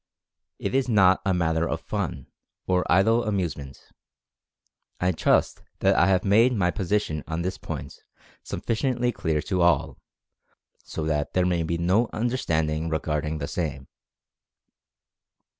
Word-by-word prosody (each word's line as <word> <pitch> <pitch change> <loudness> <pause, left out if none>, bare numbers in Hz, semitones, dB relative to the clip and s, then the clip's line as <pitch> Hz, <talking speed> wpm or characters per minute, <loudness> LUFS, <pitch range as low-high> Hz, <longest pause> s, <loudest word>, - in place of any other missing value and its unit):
It - - -4
is 135 -1 +1
not 95 -4 +4
a - - +3
matter 85 -2 +1
for - - -1
fun 65 - -4 0.2
( - - -57
?), - - -65
or 90 -2 0
idle 110 +7 +4
amusement. 85 -10 -3 1.2
I 90 +1 +2
trust 80 - +1 0.2
that - - +3
I 85 - +4
have 95 -1 +2
made 115 +6 +4
my 90 -4 +1
posi 100 +1 0
tion 75 -7 -5
on 80 +1 -3
this 95 +1 -3
point - - -7 0.4
sufficiently 125 +1 -1
clear 80 -8 -1
to 95 -3 -1
all, 85 0 +2 0.8
so 80 - -5
that 75 -2 -1
there 90 -1 +2
may 90 -2 +1
be 85 +1 -1
no 95 +7 +2
misunderstanding 80 -10 -1
regarding 80 -1 -2
the 70 -1 -4
same. 75 -7 -4
90 Hz, 145 wpm, -25 LUFS, 80-105 Hz, 1.2 s, not